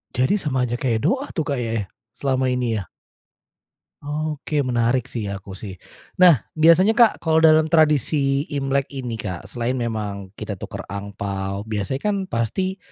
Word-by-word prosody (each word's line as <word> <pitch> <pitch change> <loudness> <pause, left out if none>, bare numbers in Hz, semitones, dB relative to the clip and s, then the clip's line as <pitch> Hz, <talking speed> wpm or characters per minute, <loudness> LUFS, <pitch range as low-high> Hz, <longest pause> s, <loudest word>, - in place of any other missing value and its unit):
Jadi 130 - +2
sama 135 -7 0
saja 120 -1 -1
kayak 115 -4 0
doa 275 +2 +1
tuh, 160 - 0
Kak, 140 -3 -2
ya 115 -2 -2
ya, - - -10 0.3
selama 130 -1 0
ini 125 -3 0
ya? 95 - -8 1.2
Oke, 150 0 -2
menarik 120 -1 +1
sih 115 -4 -4
ya, 100 -1 -5
aku 95 0 -10
sih. 100 -1 -7 0.5
Nah, 170 - +7
biasanya 170 +7 +5
Kak, 235 -2 +5
kalau 160 -1 +2
dalam 155 -1 +6
tradisi 150 -3 +2
Imlek 140 -2 -1
ini, 125 -4 -4
Kak, 95 -5 -6
selain 120 +1 -2
memang 105 -5 -3
kita 105 - -4
tukar 100 +1 -7
angpao, 100 0 -4
biasanya 110 +5 -3
kan 210 - +2
pasti 185 - -1
130 Hz, 165 wpm, -22 LUFS, 110-155 Hz, 1.2 s, Nah